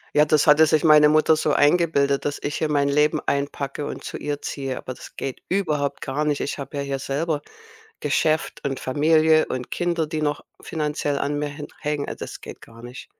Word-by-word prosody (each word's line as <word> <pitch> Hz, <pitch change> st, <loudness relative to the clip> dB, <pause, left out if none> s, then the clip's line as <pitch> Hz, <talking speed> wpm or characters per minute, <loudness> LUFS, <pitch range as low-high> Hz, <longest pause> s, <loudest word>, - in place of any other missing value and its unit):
Ja, 150 Hz, -, +6 dB
das 155 Hz, 0 st, +2 dB
hatte 150 Hz, +1 st, +7 dB
sich 155 Hz, -1 st, +2 dB
meine 150 Hz, -1 st, +7 dB
Mutter 155 Hz, +1 st, +4 dB
so 155 Hz, -1 st, 0 dB
eingebildet, 145 Hz, -3 st, +3 dB
dass 145 Hz, -, -2 dB
ich 145 Hz, -, -3 dB
hier 155 Hz, -, -1 dB
mein 145 Hz, -1 st, +2 dB
Leben 150 Hz, +2 st, +2 dB
einpacke 140 Hz, 0 st, -2 dB
und -, -, -6 dB
zu -, -, -5 dB
ihr 145 Hz, -1 st, -4 dB
ziehe, 135 Hz, -2 st, -4 dB
aber 130 Hz, -, -6 dB
das -, -, -13 dB
geht 135 Hz, -2 st, -5 dB
überhaupt 150 Hz, -7 st, -1 dB
gar 140 Hz, +3 st, -2 dB
nicht. 150 Hz, -1 st, 0 dB
Ich -, -, -3 dB
habe 140 Hz, 0 st, -7 dB
ja 140 Hz, -, -1 dB
hier 140 Hz, -1 st, -3 dB
selber 145 Hz, +3 st, -2 dB, 0.6 s
Geschäft 155 Hz, +1 st, 0 dB
und 135 Hz, -1 st, -2 dB
Familie 155 Hz, +3 st, +3 dB
und 125 Hz, -1 st, -5 dB
Kinder, 175 Hz, -2 st, 0 dB
die 155 Hz, 0 st, -3 dB
noch 145 Hz, -1 st, -1 dB, 0.2 s
finanziell 150 Hz, -2 st, -2 dB
an 145 Hz, +1 st, -1 dB
mir 150 Hz, -, -1 dB
hen 145 Hz, +1 st, -8 dB
hängen. 150 Hz, -1 st, -2 dB
Also, -, -, -6 dB
das -, -, -9 dB
geht -, -, -10 dB
gar 115 Hz, 0 st, -15 dB
nicht. 125 Hz, +1 st, -9 dB
145 Hz, 210 wpm, -23 LUFS, 140-155 Hz, 0.6 s, hatte